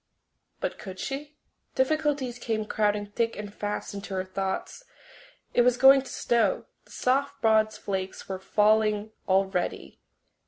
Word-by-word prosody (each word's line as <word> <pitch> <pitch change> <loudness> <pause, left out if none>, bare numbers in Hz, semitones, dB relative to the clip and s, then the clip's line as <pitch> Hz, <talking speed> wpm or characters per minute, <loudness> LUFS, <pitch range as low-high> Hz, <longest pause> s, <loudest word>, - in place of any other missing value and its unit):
But - - -3
could 190 -2 -8
she? 285 +5 -5 0.4
Difficulties 280 -3 0
came 220 -3 -2
crowding 210 -1 0
thick 230 +3 -1
and 205 -1 -6
fast 205 0 -4
into 200 -1 -6
her 185 - 0
thoughts. 190 - -4 0.7
It - - +5
was 245 0 +4
going 270 +1 +8
to 265 - -11
snow; 235 -1 +1 0.2
the - - -20
soft 275 +2 0
broad 220 -1 +4
flakes 190 -2 -5
were 190 -1 -4
falling 215 +1 +2 0.2
already. 190 - 0
215 Hz, 135 wpm, -27 LUFS, 200-255 Hz, 0.7 s, going